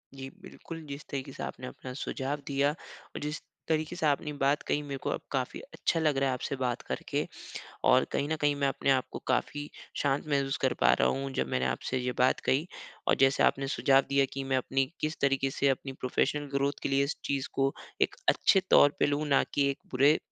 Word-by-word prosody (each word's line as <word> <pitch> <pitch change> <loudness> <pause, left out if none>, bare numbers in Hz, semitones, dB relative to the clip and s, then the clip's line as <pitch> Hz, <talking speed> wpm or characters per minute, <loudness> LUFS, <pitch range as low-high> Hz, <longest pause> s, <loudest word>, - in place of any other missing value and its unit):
जी 135 0 -7
बिल्कुल, 165 -1 -9
जिस 140 +1 -7
तरीके 135 -1 -4
से - - -7
आपने 130 - -6
अपना 130 0 -8
सुझाव 140 +2 -2
दिया 140 0 +2
और 155 - -11
जिस 150 +1 -3 0.3
तरीके 155 +1 0
से 175 - -1
आपने 150 0 +1
बात 140 +1 +1
कही 145 - +1
मेरे 140 -1 -5
को - - -1
अब - - -2
काफ़ी 130 -2 -2
अच्छा 165 - 0
लग 150 -3 +2
रहा 135 0 +2
है - - +1
आपसे 125 +2 -3
बात 125 -2 -1
करके। - - -3 0.6
और 130 0 +6
कहीं 140 - 0
न 160 - 0
कहीं 145 -1 +2
मैं 140 -1 +1
अपने 135 0 0
आप 130 -1 +3
को - - -4
काफ़ी 145 +3 0 0.3
शांत 140 +1 0
महसूस 140 -2 +1
कर 130 - +3
पा - - +6
रहा - - +4
हूँ 135 0 -1
जब - - -1
मैंने 65 0 0
आपसे 130 - -1
ये 125 0 -1
बात 125 +1 +3
कही। 140 +6 +2 0.4
और - - +5
जैसे 135 0 +5
आपने 135 0 +2
सुझाव 135 -1 +4
दिया 140 0 +3
कि 135 0 -4
मैं 135 -1 +1
अपनी 135 +1 +1 0.2
किस 155 +1 -1
तरीके 135 -1 +2
से 140 +1 +1
अपनी 135 0 -1
प्रोफेशनल 145 +3 0
ग्रोथ 140 0 +1
के - - 0
लिए 140 0 +3
इस 140 - -3
चीज़ 140 -1 -1
को 135 0 +1 0.3
एक - - +2
अच्छे 195 - +5
तौर 145 - +7
पे - - +4
लूँ 145 +1 0
ना 140 - +4
कि 140 -1 +3
एक 135 - -5
बुरे 140 +4 +4
140 Hz, 225 wpm, -30 LUFS, 135-145 Hz, 0.6 s, तौर